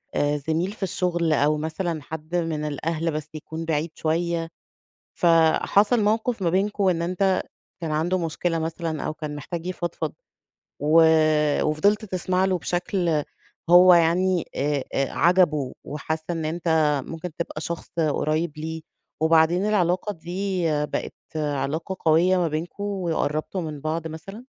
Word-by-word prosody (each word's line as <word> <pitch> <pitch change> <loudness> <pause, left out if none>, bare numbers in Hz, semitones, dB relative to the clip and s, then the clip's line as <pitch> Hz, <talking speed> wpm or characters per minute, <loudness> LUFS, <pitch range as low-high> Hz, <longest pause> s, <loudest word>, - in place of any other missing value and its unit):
آآ، 145 0 +1
زميل 160 +6 -1
في 210 - -7
الشُغل 175 -3 0
أو 150 +1 +2
مثلًا 160 +1 -3
حد 160 +3 -7
من 165 -3 -1
الأهل 160 +3 -2
بس 155 0 -5
يكون 160 +1 -6
بعيد 160 0 -1
شوية 165 +1 -1 0.7
فحصل 175 +7 +3
موقف 220 +1 0
ما 170 - +2
بينكم 195 +2 +1
إن 170 -2 +1
أنت 185 +2 +1 0.4
كان 165 -2 -3
عندُه 165 +5 +1
مشكلة 165 0 -1
مثلًا 160 -1 -3
أو - - -3
كان 150 -1 -6
محتاج 165 +4 -6
يفضفض، 175 -2 -3 0.7
و 155 +3 +5 0.6
وفضلت 200 +8 +2
تسمع 185 -1 0
له 185 -1 +1
بشكل 175 -3 0 0.5
هو 180 +1 +8
يعني 175 +1 +3
آآ، 140 -1 0
آآ، 135 - 0
عجبُه 170 -7 +3
وحس 155 +2 -4
إن 165 -2 -2
أنت 160 -3 +1
ممكن 165 +2 -6
تبقى 165 -2 -4
شخص 170 +2 -5
قريّب 155 +1 0
ليه، 160 +1 -5 0.4
وبعدين 160 +4 +4
العلاقة 195 -1 +1
دي 185 +2 -3 0.2
بقِت 145 - -4 0.2
علاقة 150 +4 -2
قوية 170 +4 +4
ما 175 -2 +2
بينكم 165 +6 -4
وقرّبتوا 175 -3 -2
من 150 -3 -6
بعض 160 +2 -2
مثلًا؟ 195 +9 -9
165 Hz, 140 wpm, -24 LUFS, 155-180 Hz, 0.7 s, هو